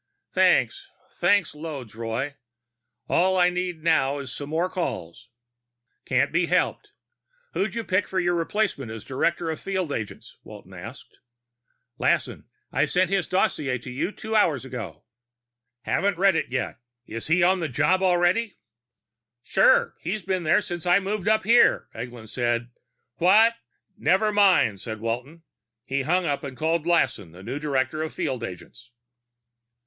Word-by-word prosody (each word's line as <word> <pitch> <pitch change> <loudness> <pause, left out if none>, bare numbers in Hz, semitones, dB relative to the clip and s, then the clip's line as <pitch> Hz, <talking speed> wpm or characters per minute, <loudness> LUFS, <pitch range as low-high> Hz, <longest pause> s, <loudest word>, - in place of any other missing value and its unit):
"Thanks. 395 0 +2 0.2
Thanks 200 -5 +2
loads, 150 -7 -7
Roy. 115 +5 -3 0.7
All 185 +2 +2
I 180 0 +4
need 180 -3 -3
now 150 -4 +2
is 135 -2 -6
some 145 +1 -6
more 165 +3 0
calls." 125 - -5 0.8
"Can't 130 +2 +1
be 170 +1 +1
helped. 180 +1 0 0.6
Who'd 205 +3 -1
you 230 - -2
pick 185 -1 0
for 190 - -1
your 175 -1 +1
replacement 170 - -1
as 110 -1 -8
director 165 +5 -1
of 160 - -5
field 190 -5 -2
agents?" 110 -6 -6
Walton 100 -3 -12
asked. 110 +9 -11 0.8
"Lassen. - - 0 0.3
I 145 +4 +2
sent 185 +2 +1
his 195 -3 +1
dossier 155 -9 0
to 125 +1 -9
you 135 +10 -2 0.2
hours 160 - +2
ago." 115 -10 -7 0.8
"Haven't 195 +1 0
read 195 0 +4
it - - -1
yet. 125 -2 -3 0.3
Is 115 -1 -6
he 175 +3 +3
on 185 +1 +4
the 160 -3 -2
job 185 +9 +2
already?" 185 +4 +2 0.9
"Sure. - - +4
He's 190 +4 -3
been 185 0 -1
there 170 +5 +3
since 175 -3 -5
I 175 +1 +6
moved 200 0 -3
up 220 0 +3
here," 230 +4 +4
Eglin 120 -2 -8
said. 120 0 -1 0.5
"What 215 +7 +5 0.3
" - - -62
"Never 205 +4 +3
mind," 190 - +4
said 110 -1 -6
Walton. 125 +9 -4 0.4
He 135 +2 -1
hung 175 +6 +1
up 145 -3 -1
and 130 -2 -7
called 165 +1 0
Lassen, 110 - +1
the 90 +2 -12
new 140 - -4
director 140 0 -1
of 160 - -3
field 135 -9 -2
agents. 95 +4 -9
160 Hz, 155 wpm, -25 LUFS, 125-185 Hz, 0.9 s, I